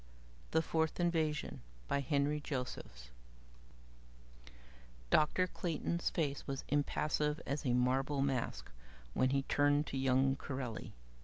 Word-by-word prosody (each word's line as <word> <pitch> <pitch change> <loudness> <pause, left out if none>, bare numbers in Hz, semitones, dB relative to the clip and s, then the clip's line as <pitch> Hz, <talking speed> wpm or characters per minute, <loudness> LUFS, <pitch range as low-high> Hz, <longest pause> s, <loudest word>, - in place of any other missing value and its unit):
_ - - -24
THE 160 - +2
FOURTH 160 0 0
INVASION 160 - 0 0.3
by - - +1
Henry 140 +2 +1
Josephs 125 - -5 2.0
Dr. 155 +4 +4
Clayton's 170 -1 -1
face 145 -4 -2
was 135 -1 -3
impassive 150 +1 +1
as 140 0 -2
a 120 - +3
marble 135 +3 +2
mask 135 - -2 0.4
when 130 - +3
he 135 0 +1
turned 145 +1 +3
to 135 - -3
young 135 +1 +3
Corelli. 130 -5 -5
140 Hz, 120 wpm, -35 LUFS, 130-150 Hz, 2.0 s, Dr